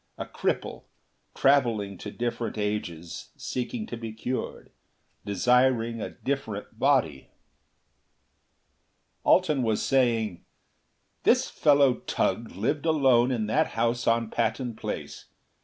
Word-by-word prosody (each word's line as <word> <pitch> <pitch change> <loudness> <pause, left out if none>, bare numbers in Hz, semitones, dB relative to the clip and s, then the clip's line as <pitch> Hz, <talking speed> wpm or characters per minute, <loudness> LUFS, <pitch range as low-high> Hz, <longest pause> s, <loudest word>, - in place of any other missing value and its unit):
A - - -4
cripple, - - -3 0.5
traveling 115 -8 +2
to 105 - -6
different 120 0 -3
ages 95 -6 -4
seeking 215 - -4
to 120 - -6
be 115 -1 -6
cured. 125 +4 -5 0.6
Desiring 115 +2 +2
a - - -3
different 115 -6 -5
body.... 125 - +2 2.0
Alten 155 -7 +3
was 110 -3 0
saying, 115 -8 +1 0.8
"This - - +3
fellow 140 -3 +4
Tugh 115 0 0
lived 145 - -1
alone 130 -6 +4
in 120 -4 -1
that 110 - +2
house 120 +1 0
on 115 -1 +2
Patton 125 -4 -1
Place. - - -6
120 Hz, 105 wpm, -27 LUFS, 110-130 Hz, 2.0 s, fellow